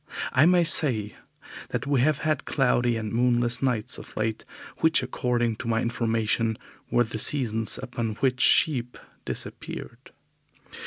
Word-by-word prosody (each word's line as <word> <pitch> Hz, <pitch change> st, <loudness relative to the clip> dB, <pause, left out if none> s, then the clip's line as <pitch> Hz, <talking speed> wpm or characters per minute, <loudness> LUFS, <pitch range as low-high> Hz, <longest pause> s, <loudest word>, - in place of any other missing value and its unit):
I 135 Hz, +5 st, +5 dB
may 180 Hz, -1 st, +4 dB
say 115 Hz, -11 st, +3 dB, 0.5 s
that -, -, -3 dB
we 140 Hz, -3 st, +1 dB
have 150 Hz, +2 st, +2 dB
had 155 Hz, -2 st, 0 dB
cloudy 120 Hz, -3 st, +1 dB
and 110 Hz, -2 st, -4 dB
moonless 120 Hz, 0 st, +1 dB
nights 125 Hz, -5 st, -1 dB
of -, -, -13 dB
late, 110 Hz, 0 st, -2 dB, 0.3 s
which 160 Hz, -4 st, +3 dB
according 120 Hz, -3 st, -1 dB
to 115 Hz, -, -7 dB
my 115 Hz, -1 st, +1 dB
information 115 Hz, -1 st, -1 dB, 0.3 s
were 120 Hz, -, +3 dB
the 110 Hz, -1 st, -6 dB
seasons 115 Hz, -4 st, +2 dB
upon 115 Hz, -3 st, -4 dB
which 125 Hz, +1 st, 0 dB
sheep 125 Hz, -6 st, +2 dB, 0.3 s
disappeared. -, -, -7 dB
120 Hz, 140 wpm, -25 LUFS, 115-130 Hz, 0.5 s, I